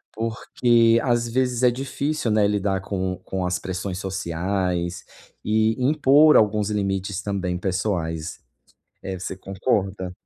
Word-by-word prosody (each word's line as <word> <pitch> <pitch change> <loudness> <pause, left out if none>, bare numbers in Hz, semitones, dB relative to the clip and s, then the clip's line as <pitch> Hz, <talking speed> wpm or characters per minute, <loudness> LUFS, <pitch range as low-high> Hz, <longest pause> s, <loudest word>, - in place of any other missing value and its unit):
porque, 115 +1 +2
às 120 -2 +1
vezes 125 0 0
é 125 - +7
difícil, 135 0 -2
né, 105 -1 +3
lidar 100 -2 0
com 95 -2 -3
com 95 -1 -3
as 90 0 -1
pressões 95 0 -4
sociais 90 -1 -2 0.4
e 110 +1 +2
impor 150 +2 +5
alguns 105 -1 +2
limites 100 -1 -2
também 95 -3 -2
pessoais. 85 -4 -2 0.6
Eh, 95 -1 -5
você 95 0 -5
concorda? 95 -1 -2
100 Hz, 125 wpm, -23 LUFS, 95-115 Hz, 0.6 s, é